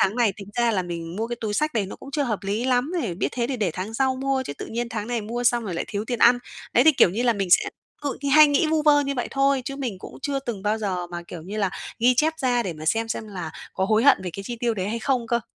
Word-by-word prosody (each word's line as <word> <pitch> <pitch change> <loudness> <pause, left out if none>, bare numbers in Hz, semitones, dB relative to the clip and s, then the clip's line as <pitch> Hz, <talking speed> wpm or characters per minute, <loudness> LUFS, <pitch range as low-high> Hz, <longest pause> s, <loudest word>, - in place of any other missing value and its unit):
"tháng 195 +4 +2
này 235 -5 +3
tính 200 -1 -10
ra 235 -1 +3
là 190 -4 0
mình 170 0 -6
mua 225 - -1
cái 240 0 -4
túi 210 -2 -2
xách 305 0 0
này 205 -4 +1
nó - - -8
cũng 275 - -11
chưa 290 +1 0
hợp 225 -6 -1
lý 205 +5 -2
lắm 255 +5 +1
nè, 185 -7 -2
biết - - -1
thế 240 -1 -1
thì 265 -1 -2
để 205 -6 0
tháng 195 +5 -5
sau 260 +1 +1
mua 270 0 0
chứ 195 - -5
tự - - -5
nhiên 235 +1 -3
tháng 220 -2 -4
này 240 -2 -1
mua 235 +3 -4
xong 240 -1 +3
rồi 185 -4 -4
lại - - -2
thiếu 205 0 -3
tiền 240 0 -3
ăn." 245 +1 +6 0.3
Đấy, 245 - +5
thì, 315 - +7
kiểu 185 - +5
như 225 +6 -2
là, 240 - +4
mình 195 -4 -2
sẽ - - +6 0.4
ự 285 - -3
thì 280 - -1
hay 305 +2 +8
nghĩ 290 +2 +2
vu 310 0 +1
vơ 295 -1 +5
như 280 -1 -2
vậy 245 - -2
thôi, 275 -1 +2
chứ 275 - -5
mình 245 -9 -4
cũng - - -10
chưa 280 -1 -1
từng 225 -7 -5
bao 210 +1 0
giờ 185 -4 -2
mà, 175 0 -6
kiểu 165 -3 -8
như 200 +5 -7
là, 195 -3 +1 0.3
ghi 245 +2 +4
chép 310 +5 +3
ra 245 -2 +2
để 185 -5 -3
mà 155 0 -9
xem 225 +5 +1
xem 220 -1 -4
là 180 -5 -5 0.2
có 190 - 0
hối 220 +4 +2
hận 280 - +7
về 180 - -4
cái 195 - -6
chi 240 +4 -5
tiêu 235 -2 +1
đấy 190 -1 -2
hay 230 +2 -2
không 250 -1 0
cơ. 235 +1 +1
230 Hz, 320 wpm, -24 LUFS, 200-260 Hz, 0.4 s, hay